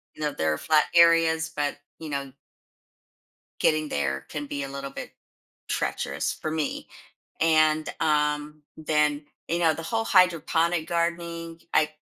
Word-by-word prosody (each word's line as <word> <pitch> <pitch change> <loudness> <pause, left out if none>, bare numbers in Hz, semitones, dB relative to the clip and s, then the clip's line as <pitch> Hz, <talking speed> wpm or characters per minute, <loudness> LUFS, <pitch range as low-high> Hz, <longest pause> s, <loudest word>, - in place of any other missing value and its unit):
you - - -11
know, 150 - 0
there 80 0 0
are - - -3
flat 155 -1 +4
areas, 165 -1 +5
but, 145 -1 -1 0.2
you 160 - -7
know 140 -2 -4 1.3
getting 155 -1 +2
there 70 -1 -2
can 150 -1 -4
be 140 0 -4
a 135 - -5
little 140 0 -6
bit - - -8 0.6
treacherous - - -2
for 155 - -5
me, 155 -2 -3 0.5
and, 155 -1 +3
um, 150 -1 0
then, 150 -1 +1 0.2
you 170 +1 0
know, 165 -2 +4
the 165 - -7
whole 225 +5 -1
hydroponic 170 -3 +3
gardening, 170 -1 -2
I 150 0 +3
155 Hz, 145 wpm, -26 LUFS, 150-165 Hz, 1.3 s, areas